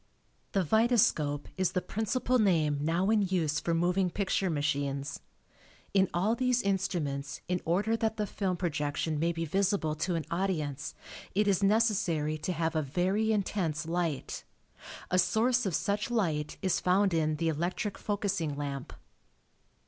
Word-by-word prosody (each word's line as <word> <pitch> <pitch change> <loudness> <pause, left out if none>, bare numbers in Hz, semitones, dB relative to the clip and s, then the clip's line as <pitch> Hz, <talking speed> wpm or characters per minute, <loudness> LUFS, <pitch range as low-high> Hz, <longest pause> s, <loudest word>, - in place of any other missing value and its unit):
The 195 -3 +2
vitascope 180 - +2
is 185 -1 +1
the - - +2
principal 245 +4 0
name 160 -8 +2
now 170 +6 +1
in 220 -2 +4
use 175 -6 0
for 170 - -1
moving 180 +2 +2
picture 195 0 0
machines. 140 -2 -1 0.7
In 190 -2 +4
all 190 +6 +1
these 250 0 +1
instruments 170 -8 -2
in 180 0 -1
order 200 +7 +1
that 225 -1 -1
the 210 - 0
film 190 -2 -2
projection 150 -2 -1
may 165 +2 +2
be 165 0 -3
visible 190 -2 +1
to 175 +3 -1
an 160 -3 -2
audience 160 -6 -2 0.4
it 210 +1 +3
is 200 -1 +2
necessary 195 -8 +2
to 160 +4 -2
have 165 -1 -1
a 155 - +2
very 185 +9 0
intense 180 -6 -1
light. 165 -3 -2 0.7
A 185 - +4
source 225 +6 +2
of 180 - 0
such 205 +2 -1
light 160 -11 -1
is 185 -2 +2
found 190 +1 +2
in 155 -2 +1
the 165 +1 0
electric 175 +6 -2
focusing 200 -7 -1
lamp. 140 -2 -5
180 Hz, 150 wpm, -30 LUFS, 155-200 Hz, 0.7 s, in